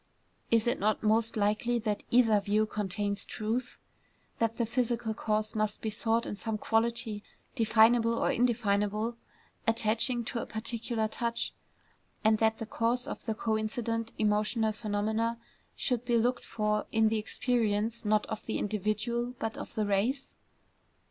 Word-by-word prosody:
Is 230 -1 +3
it 240 +2 +1
not 215 +2 +1
most 225 +1 +2
likely 215 +4 +1
that 215 -3 -1
either 225 -4 +5
view 210 +2 +1
contains 205 -1 -2
truth; 230 +4 -3 0.6
that 230 0 0
the 235 - +1
physical 235 -1 -1
cause 215 0 -1
must 215 -1 0
be 220 - -3
sought 225 +2 +1
in - - -4
some 220 +1 -3
quality, 225 -1 +1 0.3
definable 230 0 +4
or - - +2
indefinable, 220 -2 +1 0.5
attaching 225 +2 +2
to 235 0 -3
a - - -6
particular 230 0 -2
touch; 235 +1 -2 0.7
and 220 0 +4
that 220 0 +3
the 225 - -5
cause 235 +3 0
of - - -6
the 220 - -1
coincident 225 +1 -1
emotional 215 +1 +1
phenomena 220 +2 -1 0.4
should 245 -3 -1
be 240 -1 +2
looked 240 +2 +1
for 210 -1 -1
in 220 -1 +4
the 220 0 0
experience, 225 -1 0
not 210 0 +2
of 220 - -5
the 220 - -1
individual, 215 +4 -1
but 225 -2 -3
of - - -8
the 215 -2 +1
race? 215 +8 0
220 Hz, 150 wpm, -30 LUFS, 215-235 Hz, 0.7 s, either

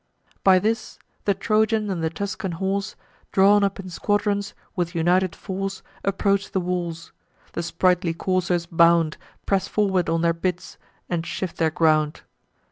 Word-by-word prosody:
By 190 -1 +7
this, 220 +5 -1 0.3
the 200 - +2
Trojan 215 +1 +1
and 170 -3 -2
the 160 - +1
Tuscan 190 +1 -4
horse, 195 +3 -2 0.4
Drawn 200 +1 +5
up 200 0 0
in 185 -1 -7
squadrons, 205 +1 0 0.2
with 175 -1 -2
united 175 +2 +2
force, 195 0 -5 0.2
Approach 195 0 +1
the 190 - +2
walls: 175 -2 -3 0.4
the - - -2
sprightly 175 0 +1
coursers 180 -1 0
bound, 170 -2 +4 0.3
Press 195 -1 +1
forward 190 -5 +1
on 165 0 +1
their 170 0 +3
bits, 180 +1 -4 0.3
and 170 -2 -1
shift 180 +1 -4
their 160 -1 +2
ground. 155 -1 +2
185 Hz, 145 wpm, -24 LUFS, 170-195 Hz, 0.4 s, By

